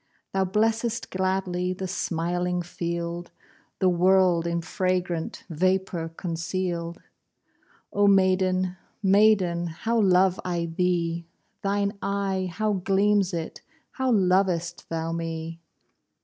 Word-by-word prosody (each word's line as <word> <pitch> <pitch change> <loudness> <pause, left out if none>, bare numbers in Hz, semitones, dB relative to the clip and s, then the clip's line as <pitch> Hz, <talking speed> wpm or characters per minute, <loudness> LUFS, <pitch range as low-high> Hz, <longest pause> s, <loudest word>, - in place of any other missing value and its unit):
Thou 190 0 +2
blessest 225 +4 0
gladly 185 -1 -1
The 190 +1 -5
smiling 175 0 -1
field, 170 0 -4 0.5
The 190 - +2
world 180 -1 +4
in 170 0 -1
fragrant 180 -2 -2
Vapour 180 0 0
conceal'd. 170 0 -3 0.9
Oh 205 0 +4
maiden, 185 -1 +3 0.3
maiden, 190 -4 +4
How 225 +8 -1
love 185 -1 +4
I 175 -2 -1
thee! 170 0 -1 0.3
Thine 200 +1 -1
eye, 195 -2 -1
how 215 +3 0
gleams 195 +1 +2
it! 165 -2 -5 0.3
How 260 -1 0
lov'st 185 -4 +1
thou 165 0 -2
me! 165 0 -4
185 Hz, 105 wpm, -26 LUFS, 170-195 Hz, 0.9 s, world